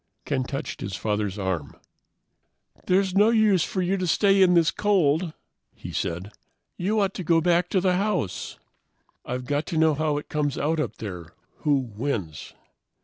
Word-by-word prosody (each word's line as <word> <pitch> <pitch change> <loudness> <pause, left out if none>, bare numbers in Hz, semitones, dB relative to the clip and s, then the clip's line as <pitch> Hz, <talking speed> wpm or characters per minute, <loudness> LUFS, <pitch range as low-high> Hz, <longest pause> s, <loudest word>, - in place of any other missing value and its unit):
Ken 135 -3 0
touched 135 +3 -5
his 95 -1 -4
father's 105 -1 -2
arm. 95 -7 -3 1.1
"There's 190 0 +2
no 205 +3 +5
use 215 -6 +4
for 185 - -2
you 190 +2 0
to 185 -1 -2
stay 195 +3 +4
in 180 -1 +5
this 165 -2 +4
cold," 180 -5 +2 0.4
he - - -8
said. 90 +5 -3 0.4
"You 210 +5 0
ought 195 -1 +1
to 185 - -5
go 165 0 +3
back 175 +1 +2
to 190 - +2
the 180 -1 +2
house." 190 - -2 0.7
"I've 125 0 -4
got 145 +3 -1
to 165 - -2
know 160 0 +4
how 150 0 0
it 150 - -6
comes 145 -2 -1
out 160 +2 0
up 150 - -2
there, 90 -6 -8 0.2
who 150 -2 +2
wins." 110 - -4
155 Hz, 170 wpm, -25 LUFS, 120-185 Hz, 1.1 s, no